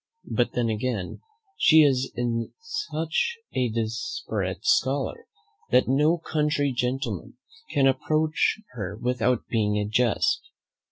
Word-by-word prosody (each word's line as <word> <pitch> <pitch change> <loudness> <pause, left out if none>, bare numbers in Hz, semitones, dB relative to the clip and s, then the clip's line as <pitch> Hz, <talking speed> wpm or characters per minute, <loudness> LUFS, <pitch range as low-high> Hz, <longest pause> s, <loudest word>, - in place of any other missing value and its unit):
But 120 - 0
then 120 -1 0
again, 110 -3 -3 0.4
she 160 -1 +7
is 135 -2 +2 0.5
such 165 - -2 0.2
a 125 -2 +1
desperate 115 - -3
scholar, 425 +3 +1 0.4
that 125 - +4
no 150 +6 +3
country 150 -3 0
gentleman 125 +3 -2 0.3
can 140 - +2
approach 155 +7 +1
her 100 -2 -5
without 125 0 0
being 105 -2 +1
a 105 - 0
jest. 125 - +2
130 Hz, 110 wpm, -26 LUFS, 120-155 Hz, 0.5 s, she